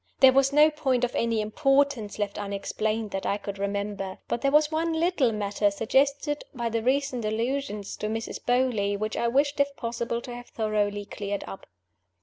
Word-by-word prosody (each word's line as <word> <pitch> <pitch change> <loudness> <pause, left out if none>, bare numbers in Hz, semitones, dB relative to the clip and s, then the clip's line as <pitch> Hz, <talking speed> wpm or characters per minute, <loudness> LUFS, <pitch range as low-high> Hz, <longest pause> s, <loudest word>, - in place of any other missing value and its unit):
There 265 -1 +8
was 275 +1 +4
no 300 +2 +6
point 265 -5 0
of 245 - 0
any 230 -2 +1
importance 270 -1 +1
left 205 -1 -2
unexplained 210 +2 -2
that 195 - -3
I 200 - +1
could 200 -1 -7
remember. 200 -1 -3
But 235 - -2
there 275 - +3
was 300 +2 +4
one 325 +1 0
little 320 -6 +2
matter 205 -1 +1
(suggested 280 +8 +1
by 235 -1 -1
the 230 0 -1
recent 260 0 0
allusions 225 -1 -2
to 210 - -3
Mrs. 225 +1 -4
Beauly) 245 -5 +1
which 215 +1 -3
I 235 - 0
wished 280 +4 +1
(if 280 0 +1
possible) 235 -1 -3
to 245 - -8
have 245 0 -9
thoroughly 205 -2 -1
cleared 200 0 -4
up. 195 - -9
235 Hz, 180 wpm, -27 LUFS, 205-275 Hz, -, There